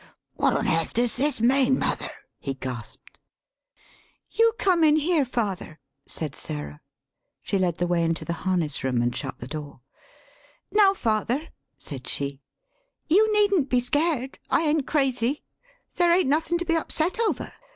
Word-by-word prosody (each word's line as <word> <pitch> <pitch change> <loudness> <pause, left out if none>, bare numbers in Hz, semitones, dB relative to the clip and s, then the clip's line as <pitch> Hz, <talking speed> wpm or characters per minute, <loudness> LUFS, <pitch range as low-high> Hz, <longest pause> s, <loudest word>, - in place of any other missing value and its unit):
" - - -63
What - - +2
on - - 0
airth 165 0 +1
does 240 0 +2
this 280 -2 +1
mean, 260 +2 +4
mother?" - - -1 0.3
[he 135 -1 -4
gasped]. 130 -3 -8 1.1
"You 455 0 +3
come 360 -5 +3
in 305 -1 +6
here, 310 -1 +2
father," 200 -10 -3 0.3
[said 155 -4 -4
Sarah. 75 - -7 0.6
She 195 - 0
led 175 -3 0
the 175 - 0
way 175 -1 +1
into 165 0 -1
the 170 - -2
harness 175 -6 -1
room 125 -2 +1
and 120 0 -1
shut - - -5
the - - -8
door]. 145 -1 -7 0.9
"Now, 400 -2 +5
father," 235 - -1 0.3
[said 130 -4 -8
she] 140 0 -2 0.7
"you 420 +7 +4
needn't 400 -9 +3
be 250 - +3
scared. 270 +1 -1
I - - +2
ain't 300 -3 +1
crazy. 270 -2 0 0.5
There 350 -1 +4
ain't 355 -3 +3
nothin' 320 +4 +1
to 350 - -4
be 330 -1 +1
upset 325 +4 -1
over. 455 -2 -1
250 Hz, 160 wpm, -25 LUFS, -, 1.1 s, in